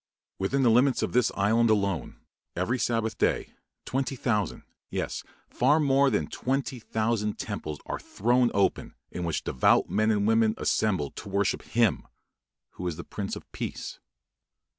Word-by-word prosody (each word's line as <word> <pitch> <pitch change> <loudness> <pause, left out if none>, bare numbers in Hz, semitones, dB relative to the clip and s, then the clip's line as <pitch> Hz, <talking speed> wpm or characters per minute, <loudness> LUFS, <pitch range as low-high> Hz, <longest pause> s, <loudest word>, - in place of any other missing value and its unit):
Within 130 +8 +1
the 120 - +5
limits 125 +3 +3
of - - -1
this 125 -1 +3
island 110 +4 +3
alone, 100 - 0 0.4
every 115 +9 0
Sabbath 115 -3 -1
day, - - 0 0.3
twenty 135 +1 -1
thousand, 105 - -1 0.3
yes, - - -3 0.2
far 145 +5 +3
more 140 -1 +4
than 105 - 0
twenty 130 - -2
thousand 110 -1 -1
temples 75 -1 -4
are - - -4
thrown 120 +3 +2
open, 100 -1 0 0.2
in 90 - -4
which 85 - -2
devout 65 - +3
men 110 +1 +2
and 105 -2 +2
women 110 0 +3
assemble 95 -10 0
to - - -9
worship 100 +1 0
Him 115 -2 +1 0.6
who 90 - -5
is 85 - -2
the 85 - -7
"Prince 100 -2 -5
of - - -8
Peace." - - -5
110 Hz, 155 wpm, -27 LUFS, 100-125 Hz, 0.6 s, the